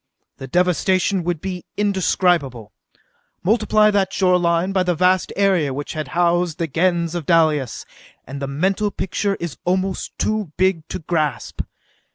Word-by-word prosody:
The 135 - -8
devastation 180 +4 +1
would 175 -3 -2
be 185 -2 -5
indescribable. 175 - 0 0.7
Multiply 215 +1 +3
that 195 -2 +1
shoreline 180 -1 +2
by 190 -1 +1
the 180 -1 +1
vast 180 +2 +2
area 180 -9 +2
which 145 +1 -5
had 155 -3 -4
housed 175 -2 +2
the 170 - -1
Gens 170 +2 0
of 170 -4 -4
Dalis, 155 -7 +2 0.4
and 135 +2 -7
the 140 - -2
mental 190 +9 0
picture 200 +1 -2
is 170 -5 -6
almost 185 +1 -2
too 215 -7 -1
big 185 -4 +1
to - - -4
grasp. 155 - -2
175 Hz, 145 wpm, -20 LUFS, 155-190 Hz, 0.7 s, Multiply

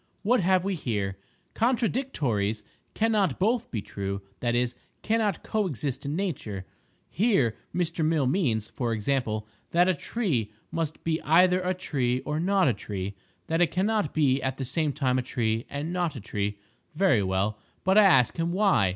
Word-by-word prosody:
What 245 +5 +3
have 185 -1 +3
we 195 +1 -1
here?—"Contradictories 120 - -1 0.3
cannot 210 - +2
both 225 +4 +1
be 110 -5 -3
true—that 100 +3 -4
is, 120 0 +1 0.3
cannot 215 -4 0
co 215 -2 0
exist 140 -3 -3
in 145 - -2
nature." 125 - -3 0.4
Here 190 - +2 0.2
Mr. 170 -1 -1
Mill 155 -3 +2
means, 125 - +1
for 120 -3 -2
example, 110 -2 -1 0.2
that 175 +2 +4
a 185 - +4
tree 155 - -1 0.2
must 160 -2 -3
be 160 -1 0
either 180 +3 +4
a 185 0 0
tree 130 -8 -1
or 150 +1 -2
not 190 +1 +3
a 125 - +3
tree—that 100 - -5
it 175 - +6
cannot 205 -1 0
be 140 -3 +2
at 130 -1 -2
the 135 - -3
same 150 +4 0
time 130 -3 +1
a - - +1
tree 115 -2 -1
and 150 +5 -4
not 175 -4 -1
a - - -5
tree. 105 0 -3 0.4
Very 160 - +4
well; 95 +3 0 0.2
but 190 +1 +3
I 215 - +8
ask 135 - +5
him 165 +1 0
why. 175 - +3
150 Hz, 165 wpm, -27 LUFS, 115-185 Hz, 0.4 s, I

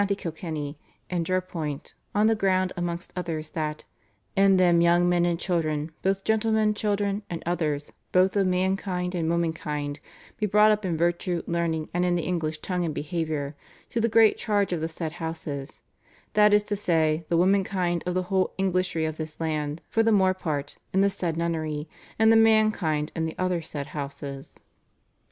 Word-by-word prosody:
Kilkenny), 155 -4 -5 0.3
and 170 -2 -1
Jerpoint, 170 -6 -3 0.2
on 210 +1 +4
the 225 - +5
ground 185 -3 +1
amongst 175 0 -4
others 160 -4 -3
that 155 -1 -3 0.5
"in 195 -1 +5
them 175 -2 +5
young 175 +1 +4
men 175 -1 +3
and 170 -1 0
children, 155 -4 -1
both 195 0 0
gentlemen 220 -1 +2
children 205 -1 -1
and 170 - -5
others 155 -4 -1 0.2
both 185 +2 +3
of 195 -2 +3
man 185 +1 +2
kind 180 -2 -3
and 165 -3 -1
woman 170 -1 +1
kind, 150 -2 -4 0.4
be 210 - +1
brought 210 +2 +5
up 210 0 0
in 170 -3 -1
virtue, 175 +1 0
learning 165 -2 -1
and 175 +1 +1
in 180 -1 +2
the 170 - -1
English 160 -3 -2
tongue 180 -2 -1
and 160 -3 -2
behaviour, 155 -3 -3 0.4
to 230 - 0
the 230 - +2
great 225 -1 +5
charge 205 -4 +1
of 165 - -2
the 160 - -1
said 160 -1 -4
houses; 155 -3 -5 0.5
that 210 0 +5
is 210 0 +5
to 205 0 -2
say, 165 -5 +1
the 170 - +2
woman 190 +3 +4
kind 180 -3 -1
of 180 - -1
the 185 - +1
whole 185 +1 0
Englishry 185 -3 0
of 155 0 -3
this 155 -1 -6
land, 155 -1 -2
for 225 - +1
the 225 0 +3
more 190 -3 +4
part, 155 -6 -4
in 190 - +3
the 200 0 +3
said 170 -4 -2
nunnery, 160 -2 -2 0.3
and 220 0 +5
the - - +6
man 220 -1 +5
kind 155 -6 -1
in 165 -1 -1
the 160 - -5
other 185 -2 0
said 145 -3 -5
houses." 140 -1 -6
175 Hz, 185 wpm, -26 LUFS, 160-195 Hz, 0.5 s, the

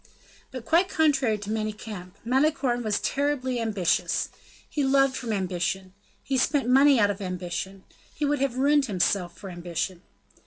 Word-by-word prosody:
But, 255 -3 -8
quite 350 +3 +3
contrary 275 - +2
to 210 0 -6
Manicamp, 215 -4 -5
Malicorne 265 -1 +1
was 215 -3 0
terribly 270 -3 -1
ambitious. 210 -6 0 0.4
He 290 - -2
loved 270 0 +3
from 240 -3 -4
ambition; 190 -1 -2 0.3
he 270 -1 0
spent 275 0 +1
money 270 +1 +6
out 205 -1 +4
of 200 0 -7
ambition; 180 0 -4
and 195 -1 -18 0.3
he 295 - -1
would 290 0 +1
have 265 -3 0
ruined 285 +1 +3
himself 180 -3 0
for 195 - -8
ambition. 175 +1 -4
230 Hz, 155 wpm, -26 LUFS, 190-275 Hz, 0.4 s, money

